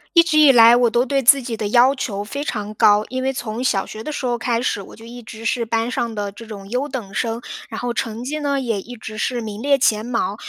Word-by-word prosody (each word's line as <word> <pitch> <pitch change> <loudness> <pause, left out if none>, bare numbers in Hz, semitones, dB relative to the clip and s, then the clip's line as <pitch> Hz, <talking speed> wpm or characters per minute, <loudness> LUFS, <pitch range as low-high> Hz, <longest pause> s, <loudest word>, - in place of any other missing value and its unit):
一 335 - +9
直 310 -2 0
以 300 -2 +8
来 235 -1 +7
我 240 -1 +3
都 240 +3 +1
对 275 +1 0
自 275 +3 +6
己 240 -2 -4
的 210 -2 -3
要 250 +4 +5
求 205 -6 -4
非 280 +7 -5
常 210 -6 -4
高。 210 0 +4
因 260 0 -4
为 265 - +1
从 240 -2 -5
小 195 -6 +1
学 220 - -9
的 305 - -5
时 290 - -4
候 240 -1 0
开 235 0 -1
始， 205 - -1
我 - - -13
就 225 - -14
一 240 +1 -10
直 220 +1 -10
是 240 0 0
班 225 +1 -1
上 235 -2 -2
的 205 -1 -3
这 230 +3 -11
种 200 -3 -10
优 255 +5 -2
等 230 -7 -6
生。 230 +1 -2 0.3
然 220 - -6
后 245 -1 -2
成 225 -1 -3
绩 300 +4 -3
呢， 285 -2 -1
也 230 -6 -2
一 245 +4 -10
直 215 0 -8
是 245 +3 -1
名 215 -1 -6
列 280 0 +3
前 225 -5 +1
茅。 230 -5 -2
235 Hz, 290 characters per minute, -20 LUFS, 215-255 Hz, 0.3 s, 一